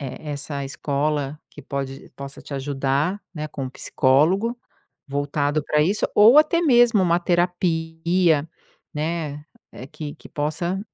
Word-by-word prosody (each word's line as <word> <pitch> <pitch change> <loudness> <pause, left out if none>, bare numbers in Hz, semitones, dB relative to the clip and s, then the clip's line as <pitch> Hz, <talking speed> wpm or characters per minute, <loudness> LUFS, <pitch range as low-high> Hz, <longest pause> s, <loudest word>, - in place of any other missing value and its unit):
e 140 - -6 0.2
essa 140 -1 -4
escola 145 +1 -2
que 145 - -13
pode 135 0 -5
possa 140 0 -9
te - - -10
ajudar, 140 +7 -1
né, 155 0 -4
com 135 -3 -5
psicólogo 180 - +2 0.5
voltado 145 +1 -1
pra 150 - +2
isso, 195 +7 +1
ou 225 +7 +7
até 310 +3 +4
mesmo 240 - +5
uma 170 -1 +3
terapia, 170 -2 +1 0.4
né, 150 -1 -3 0.3
eh, 130 - -9
que 145 +1 -7
que - - -15
possa 170 +5 -2
150 Hz, 130 wpm, -23 LUFS, 140-175 Hz, 0.5 s, ou